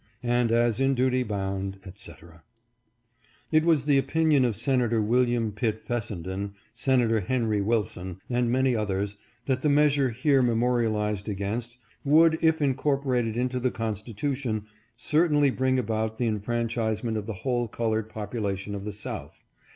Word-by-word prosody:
And 120 Hz, -1 st, +1 dB
as 115 Hz, -1 st, +2 dB
in 135 Hz, 0 st, +2 dB
duty 130 Hz, 0 st, +2 dB
bound, 95 Hz, -3 st, -3 dB
etc." 85 Hz, -3 st, -12 dB, 1.1 s
It 155 Hz, 0 st, +4 dB
was 160 Hz, -4 st, +3 dB
the 145 Hz, -2 st, +4 dB
opinion 155 Hz, -2 st, +2 dB
of 115 Hz, -4 st, 0 dB
Senator 120 Hz, 0 st, +1 dB
Wm. 120 Hz, 0 st, +1 dB
Pitt 110 Hz, +1 st, -1 dB
Fessenden, 100 Hz, -4 st, -4 dB, 0.2 s
Senator 120 Hz, -2 st, +2 dB
Henry 110 Hz, 0 st, 0 dB
Wilson, 100 Hz, -4 st, -2 dB
and 120 Hz, -1 st, 0 dB
many 130 Hz, 0 st, +2 dB
others, 100 Hz, -1 st, -2 dB, 0.3 s
that 130 Hz, -2 st, 0 dB
the 150 Hz, -, +2 dB
measure 145 Hz, -2 st, +3 dB
here 135 Hz, +4 st, +2 dB
memorialized 115 Hz, -4 st, 0 dB
against 110 Hz, +5 st, -4 dB, 0.3 s
would, 160 Hz, +3 st, +5 dB
if 160 Hz, -1 st, +3 dB
incorporated 130 Hz, -4 st, 0 dB
into 125 Hz, +1 st, -1 dB
the 125 Hz, +1 st, +1 dB
Constitution, 115 Hz, +1 st, -3 dB, 0.3 s
certainly 150 Hz, +1 st, +2 dB
bring 130 Hz, 0 st, +1 dB
about 110 Hz, -2 st, -1 dB
the 120 Hz, -, 0 dB
enfran 115 Hz, +2 st, -1 dB
chisement 110 Hz, 0 st, -2 dB
of 105 Hz, -1 st, -4 dB
the 110 Hz, -, -3 dB
whole 120 Hz, -2 st, 0 dB
colored 110 Hz, -1 st, -2 dB
population 105 Hz, -2 st, -4 dB
of 100 Hz, 0 st, -5 dB
the 105 Hz, -, -3 dB
South. 105 Hz, -, -8 dB
120 Hz, 145 wpm, -26 LUFS, 105-130 Hz, 1.1 s, would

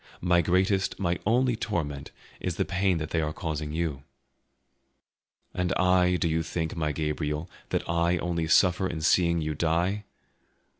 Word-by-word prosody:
My 90 Hz, -1 st, +3 dB
greatest, 95 Hz, +3 st, +1 dB
my 90 Hz, -2 st, 0 dB
only 125 Hz, +2 st, +3 dB
torment 75 Hz, -11 st, -3 dB, 0.3 s
is 90 Hz, -3 st, -3 dB
the -, -, 0 dB
pain 95 Hz, -1 st, +1 dB
that 80 Hz, -1 st, -4 dB
they 80 Hz, -, +1 dB
are 75 Hz, 0 st, -1 dB
causing 75 Hz, -2 st, -4 dB
you." 80 Hz, -4 st, -2 dB, 1.5 s
"And 90 Hz, 0 st, -1 dB
I, 90 Hz, -1 st, +3 dB
do 85 Hz, -, 0 dB
you 80 Hz, 0 st, +1 dB
think, 80 Hz, 0 st, -3 dB
my 75 Hz, -2 st, -1 dB
Gabriel, 75 Hz, +1 st, -2 dB, 0.2 s
that -, -, -1 dB
I 85 Hz, +1 st, +1 dB
only 85 Hz, -2 st, -2 dB
suffer 90 Hz, +2 st, +4 dB
in 85 Hz, -3 st, -4 dB
seeing 85 Hz, +1 st, +3 dB
you 75 Hz, 0 st, -2 dB
die? 85 Hz, +6 st, 0 dB
85 Hz, 155 wpm, -27 LUFS, 80-90 Hz, 1.5 s, suffer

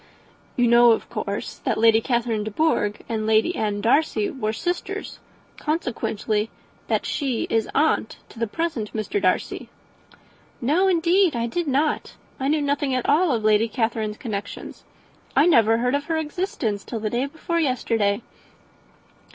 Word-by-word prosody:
"You 245 Hz, -1 st, +3 dB
know 235 Hz, 0 st, +7 dB
of -, -, -3 dB
course -, -, -4 dB
that -, -, -1 dB
Lady 225 Hz, 0 st, +5 dB
Catherine 235 Hz, -3 st, 0 dB
de 215 Hz, -, -3 dB
Bourgh 210 Hz, -5 st, 0 dB
and 220 Hz, -2 st, -2 dB
Lady 220 Hz, +11 st, +3 dB
Anne 205 Hz, -1 st, -1 dB
Darcy 315 Hz, -, +2 dB
were 245 Hz, -8 st, -2 dB
sisters; 350 Hz, +11 st, -4 dB, 0.4 s
consequently 225 Hz, -8 st, -2 dB, 0.4 s
that -, -, 0 dB
she 265 Hz, -6 st, -1 dB
is 225 Hz, -1 st, +1 dB
aunt 300 Hz, -6 st, +1 dB
to -, -, -13 dB
the 230 Hz, -, 0 dB
present 255 Hz, -5 st, -3 dB
Mr. 220 Hz, -, -2 dB
Darcy." -, -, 0 dB, 0.9 s
"No, 305 Hz, +10 st, +2 dB
indeed, 350 Hz, -2 st, +3 dB
I 235 Hz, 0 st, 0 dB
did 330 Hz, +8 st, -2 dB
not. 290 Hz, +3 st, 0 dB, 0.2 s
I 265 Hz, -, -1 dB
knew 300 Hz, +1 st, +1 dB
nothing 285 Hz, -1 st, 0 dB
at 255 Hz, -, -1 dB
all 315 Hz, +3 st, +4 dB
of 230 Hz, -4 st, 0 dB
Lady 215 Hz, +1 st, +4 dB
Catherine's 220 Hz, -2 st, -2 dB
connections. 205 Hz, -4 st, -6 dB, 0.5 s
I 285 Hz, -, +5 dB
never 225 Hz, -9 st, +5 dB
heard 250 Hz, +2 st, 0 dB
of 285 Hz, 0 st, 0 dB
her 325 Hz, 0 st, -1 dB
existence 295 Hz, -, -2 dB
till 230 Hz, -, -5 dB
the 215 Hz, -1 st, -3 dB
day 250 Hz, +3 st, 0 dB
before 325 Hz, +3 st, -3 dB
yesterday." 230 Hz, -7 st, 0 dB
240 Hz, 155 wpm, -23 LUFS, 220-310 Hz, 0.9 s, know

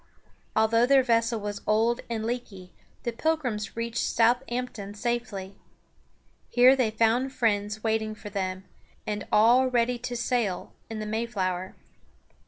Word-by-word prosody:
Although 230 Hz, +2 st, +4 dB
their 270 Hz, 0 st, +5 dB
vessel 230 Hz, -1 st, +1 dB
was 205 Hz, 0 st, -5 dB
old 225 Hz, +3 st, +2 dB
and 220 Hz, -2 st, -2 dB
leaky, 220 Hz, -6 st, -5 dB, 0.3 s
the 235 Hz, -, -1 dB
Pilgrims 245 Hz, -6 st, -2 dB
reached 230 Hz, 0 st, -2 dB
South 235 Hz, +2 st, +3 dB
amp´ton 240 Hz, -5 st, -5 dB
safely. 210 Hz, -4 st, -3 dB, 1.0 s
Here 250 Hz, +2 st, +6 dB
they 255 Hz, -4 st, +2 dB
found 230 Hz, +5 st, +1 dB
friends 210 Hz, -2 st, 0 dB
waiting 220 Hz, -1 st, 0 dB
for 210 Hz, -1 st, -10 dB
them, 190 Hz, -1 st, -3 dB, 0.4 s
and 210 Hz, -1 st, -4 dB
all 240 Hz, +5 st, +5 dB
ready 245 Hz, -1 st, +1 dB
to 245 Hz, 0 st, -4 dB
sail 230 Hz, -6 st, -1 dB, 0.2 s
in 225 Hz, -, -5 dB
the 215 Hz, -, -4 dB
Mayflower. 200 Hz, -5 st, -2 dB
230 Hz, 135 wpm, -27 LUFS, 210-245 Hz, 1.0 s, Here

